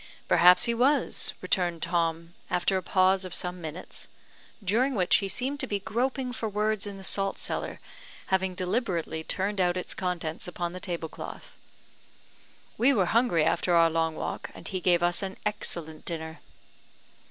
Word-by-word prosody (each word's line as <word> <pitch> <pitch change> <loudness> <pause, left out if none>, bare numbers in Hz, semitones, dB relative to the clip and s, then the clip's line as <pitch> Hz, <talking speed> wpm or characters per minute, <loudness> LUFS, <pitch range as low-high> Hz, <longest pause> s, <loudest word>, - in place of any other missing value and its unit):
"Perhaps 180 +1 +7
he 235 - +2
was," 265 +5 +2
returned 175 -4 +1
Tom, 165 -1 -1 0.2
after 180 +2 +1
a 190 - +1
pause 185 +1 +3
of 185 -2 -4
some 180 0 -2
minutes, 160 +2 -6 0.6
during 240 +8 +2
which 180 -5 +4
he 195 +3 -2
seemed 260 +8 0
to 265 - +2
be 205 - 0
groping 250 +5 -1
for 225 -1 -3
words 210 0 0
in 200 -1 -7
the 195 - -10
salt 195 +1 -1
cellar, - - -3 0.5
having 190 -1 +1
deliberately 180 -5 -1
turned 195 +3 -1
out 175 0 +2
its 180 - -4
contents 175 -3 -3
upon 175 -1 -4
the 185 - -6
tablecloth. 170 -4 -6 1.2
"We 265 +4 +5
were 195 -7 +3
hungry 225 -9 +3
after 175 +2 +2
our 165 -1 +5
long 165 0 0
walk, - - -4
and - - -9
he 185 -1 -3
gave 175 -1 +3
us 175 +2 +2
an 190 -1 -5
excellent 165 -6 -1
dinner." 160 -1 -5
185 Hz, 165 wpm, -28 LUFS, 170-210 Hz, 1.2 s, Perhaps